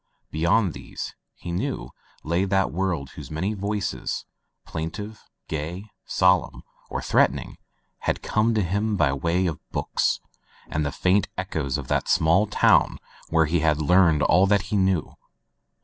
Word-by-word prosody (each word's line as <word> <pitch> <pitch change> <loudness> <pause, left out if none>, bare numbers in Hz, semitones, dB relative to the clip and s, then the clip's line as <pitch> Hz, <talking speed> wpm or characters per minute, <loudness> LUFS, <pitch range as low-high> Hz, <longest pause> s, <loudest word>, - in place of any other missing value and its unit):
Be 75 - -4
yond 90 +3 +3
these, - - -7 0.2
he 85 - -7
knew, 65 -8 -3 0.3
lay 85 +4 +1
that 95 0 +1
world 85 -6 -2
whose - - -9
many 90 +7 -2
voices, 105 +1 -3 0.4
plaintive, 100 +7 -5 0.3
gay, 85 +7 -5 0.2
solemn, 90 -1 +2 0.3
or - - -3
threatening, - - +1 0.4
had - - -2
come 110 +2 +1
to 105 - +2
him 100 +4 0
by 70 -6 +3
way 85 +6 0
of 80 -5 -2
books - - 0 0.5
and 75 - -1
the 70 - -1
faint 95 +6 +2
echoes 80 -8 -2
of 70 -3 -6
that - - 0
small 85 +5 +4
town 105 - +4 0.3
where 80 0 +4
he 85 +3 +1
had 75 -1 +2
learned 80 -1 +4
all 95 +3 +5
that 100 0 +3
he - - +3
knew. 95 -4 +1
90 Hz, 150 wpm, -25 LUFS, 80-100 Hz, 0.5 s, all